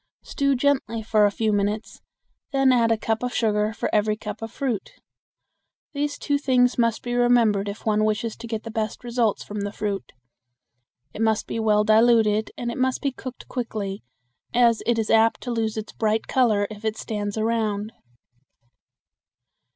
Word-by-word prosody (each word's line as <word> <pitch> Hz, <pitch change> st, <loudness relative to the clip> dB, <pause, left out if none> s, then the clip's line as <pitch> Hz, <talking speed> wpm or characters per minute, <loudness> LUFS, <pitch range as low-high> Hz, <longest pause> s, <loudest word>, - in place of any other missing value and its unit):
Stew 280 Hz, -1 st, 0 dB
gently 250 Hz, -4 st, 0 dB
for 215 Hz, -1 st, +4 dB
a -, -, -1 dB
few 215 Hz, +1 st, 0 dB
minutes, 205 Hz, +2 st, -2 dB, 0.5 s
then 270 Hz, -1 st, +4 dB
add 235 Hz, -2 st, +3 dB
a 225 Hz, -, +3 dB
cup 220 Hz, +1 st, -1 dB
of 250 Hz, 0 st, -3 dB
sugar 210 Hz, -1 st, +1 dB
for 225 Hz, -, -3 dB
every 215 Hz, 0 st, +2 dB
cup 210 Hz, 0 st, -7 dB
of 225 Hz, -1 st, -6 dB
fruit. 245 Hz, -8 st, -3 dB, 1.0 s
These 290 Hz, 0 st, -2 dB
two 285 Hz, -1 st, 0 dB
things 250 Hz, -3 st, +3 dB
must 230 Hz, -1 st, +1 dB
be 240 Hz, -, -3 dB
remembered 235 Hz, -5 st, +3 dB
if 200 Hz, -, -8 dB
one 215 Hz, -1 st, +2 dB
wishes 215 Hz, +1 st, -1 dB
to 235 Hz, -, -8 dB
get 225 Hz, -1 st, -4 dB
the 225 Hz, -, -7 dB
best 220 Hz, 0 st, -3 dB
results 235 Hz, -3 st, 0 dB
from 210 Hz, 0 st, -5 dB
the 200 Hz, 0 st, -3 dB
fruit. 205 Hz, -2 st, -4 dB, 1.0 s
It -, -, -6 dB
must 220 Hz, -1 st, +1 dB
be -, -, -4 dB
well 210 Hz, -1 st, +3 dB
diluted 220 Hz, -1 st, +4 dB
and 240 Hz, -1 st, -3 dB
it 235 Hz, -, -6 dB
must 260 Hz, 0 st, 0 dB
be 280 Hz, -, +1 dB
cooked 255 Hz, -1 st, -9 dB
quickly, 215 Hz, -5 st, -4 dB, 0.5 s
as 235 Hz, -2 st, +4 dB
it 235 Hz, -1 st, +2 dB
is 220 Hz, -1 st, 0 dB
apt 225 Hz, 0 st, +4 dB
to 245 Hz, -, -4 dB
lose 225 Hz, -2 st, -1 dB
its 215 Hz, -, -5 dB
bright 220 Hz, 0 st, 0 dB
color 220 Hz, -6 st, +2 dB
if 210 Hz, 0 st, -10 dB
it 220 Hz, 0 st, -1 dB
stands 205 Hz, -1 st, -4 dB
around. 220 Hz, -1 st, -1 dB
225 Hz, 175 wpm, -24 LUFS, 210-240 Hz, 1.0 s, for